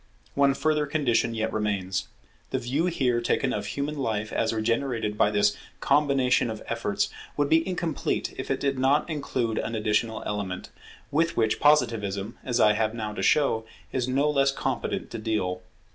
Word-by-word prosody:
One 140 -1 +3
further 150 0 +1
condition 120 -6 +1
yet 110 0 -1
remains. 100 -3 -1 0.4
The - - -1
view 140 +8 0
here 125 -8 +1
taken 130 +2 +1
of 105 -1 -3
human 145 +1 -3
life 110 -4 -2
as 110 - +1
regenerated 115 -1 -1
by 105 - +3
this 105 0 +2 0.2
combination 135 -4 +3
of 110 -1 -6
efforts, - - -1 0.3
would 145 -1 +1
be 165 +2 +3
incomplete 170 -4 -2
if - - -6
it - - 0
did 135 -2 0
not 135 +3 +3
include 130 -7 -2
an 115 - -3
additional 110 +1 0
element, 100 -3 -4 0.4
with 165 +3 +1
which 110 -1 +2
Positivism, 110 -8 +2
as 125 -1 -1
I 105 -2 +6
have 110 +1 0
now 110 -2 -4
to 95 - -4
show, 115 0 +3 0.3
is 125 -1 -1
no 135 +3 +2
less 140 -2 +3
competent - - -3
to - - -5
deal. 105 -5 -1
120 Hz, 170 wpm, -26 LUFS, 110-140 Hz, 0.4 s, I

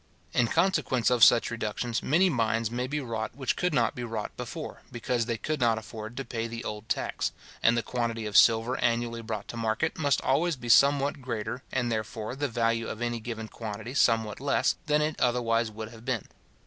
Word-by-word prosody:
In 120 - +3
consequence 130 -8 +2
of 120 -2 +4
such 120 0 +6
reductions, 115 0 -2
many 170 +7 +3
mines 115 -6 0
may 125 +1 -2
be 150 +3 -2
wrought 115 -4 -4
which 135 -2 -1
could 180 - 0
not 120 -6 +2
be 125 - -5
wrought 115 -3 -4
before, - - -6
because 120 -1 -1
they 115 -2 -1
could 155 +5 -2
not 115 -3 +3
afford 110 +1 -8
to 135 - -3
pay 115 -1 -3
the 115 +1 -6
old 105 +1 -6
tax; - - -1 0.3
and 115 +1 +4
the 120 - 0
quantity 115 -1 -2
of 105 -1 -5
silver 115 +2 +5
annually 115 0 0
brought 110 -2 -5
to 120 - -6
market, 115 +8 -1
must 145 -3 +2
always 160 +5 +2
be 120 -2 -8
somewhat 140 +3 +4
greater, 125 0 -4
and, 120 -2 0
therefore, 110 +1 -3
the 145 +1 -1
value 115 -1 0
of 110 - -5
any 120 -1 -2
given 110 -1 -5
quantity 110 +2 -6
somewhat 115 -5 +2
less, 140 +1 +1
than 150 0 +3
it 155 0 -2
otherwise 120 -2 +2
would 110 0 -7
have 115 0 -13
been. 120 -5 -2
115 Hz, 200 wpm, -28 LUFS, 115-130 Hz, 0.3 s, such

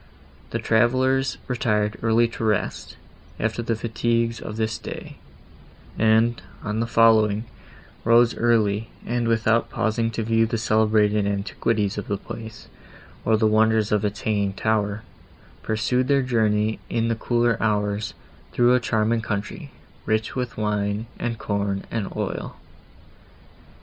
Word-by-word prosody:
The - - -2
travellers 130 +3 +2
retired 105 -4 0
early 115 +1 +3
to 115 - -6
rest, 110 -3 -1 0.4
after 115 +1 -1
the 115 -1 -1
fatigues 115 +1 -1
of 110 - -7
this 110 -1 -1
day; - - -8 0.8
and, 115 +2 +3 0.2
on 105 0 -2
the 115 - 0
following, 110 -2 +4 0.6
rose 115 +1 +4
early, 110 -2 +1 0.2
and, 120 0 -1
without 115 0 +2
pausing 115 +1 0
to 115 0 -3
view 115 0 +2
the 115 - -2
celebrated 110 -2 +2
antiquities 100 +1 -1
of 100 - -7
the 100 - -1
place, 110 +2 -9 0.6
or 110 -1 +3
the 110 - +2
wonders 110 0 +3
of 105 -1 +2
its 105 -1 -2
hanging 100 -2 0
tower, 105 0 -1 0.6
pursued 125 +4 0
their 140 -1 +3
journey 110 -3 +1
in 115 0 0
the 115 - 0
cooler 120 0 +1
hours, 105 -1 0 0.4
through 120 0 +4
a 125 - +4
charming 115 0 +1
country, 110 - -4 0.4
rich 110 0 0
with 125 -3 -3
wine, 105 0 -1
and 115 -1 -2
corn 100 -2 -2
and 110 -4 -3
oil. - - -4
110 Hz, 135 wpm, -23 LUFS, 105-115 Hz, 0.8 s, following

